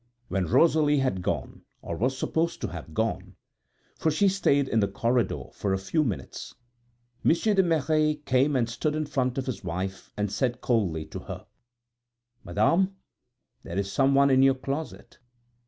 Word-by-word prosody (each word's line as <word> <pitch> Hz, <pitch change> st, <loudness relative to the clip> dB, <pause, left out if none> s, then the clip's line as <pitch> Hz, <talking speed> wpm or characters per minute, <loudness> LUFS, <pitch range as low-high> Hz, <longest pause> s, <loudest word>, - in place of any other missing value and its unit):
When 95 Hz, -2 st, -1 dB
Rosalie 150 Hz, -, +4 dB
had 130 Hz, -9 st, 0 dB
gone, -, -, -3 dB, 0.2 s
or 85 Hz, -, -4 dB
was 130 Hz, +8 st, 0 dB
supposed 170 Hz, +4 st, -1 dB
to -, -, -2 dB
have 80 Hz, -2 st, -9 dB
gone 110 Hz, +1 st, -2 dB, 0.6 s
(for 160 Hz, -, +2 dB
she 160 Hz, +6 st, +2 dB
stayed 145 Hz, -8 st, +2 dB
in 115 Hz, -, +1 dB
the 100 Hz, -, +2 dB
corridor 115 Hz, +4 st, 0 dB
for 100 Hz, -2 st, -1 dB
a -, -, +1 dB
few 125 Hz, -, 0 dB
minutes), 115 Hz, -9 st, -5 dB, 0.7 s
Monsieur 210 Hz, +6 st, +3 dB
de 195 Hz, -, +5 dB
Merret 155 Hz, -3 st, +1 dB
came 135 Hz, +2 st, +2 dB
and 120 Hz, -3 st, +2 dB
stood 125 Hz, +6 st, -2 dB
in 155 Hz, 0 st, -1 dB
front 130 Hz, -3 st, -1 dB
of 135 Hz, -, -1 dB
his 125 Hz, -7 st, -5 dB
wife, 95 Hz, +2 st, -4 dB
and 105 Hz, -1 st, -1 dB
said 120 Hz, +2 st, -1 dB
coldly 95 Hz, -12 st, 0 dB
to -, -, -7 dB
her: -, -, -8 dB, 1.0 s
"Madame, 165 Hz, -, +2 dB, 0.7 s
there 85 Hz, -, -7 dB
is 100 Hz, 0 st, -1 dB
someone 140 Hz, 0 st, +4 dB
in 130 Hz, 0 st, +5 dB
your 135 Hz, 0 st, +5 dB
closet!" 140 Hz, +4 st, -6 dB
130 Hz, 165 wpm, -27 LUFS, 100-155 Hz, 1.0 s, de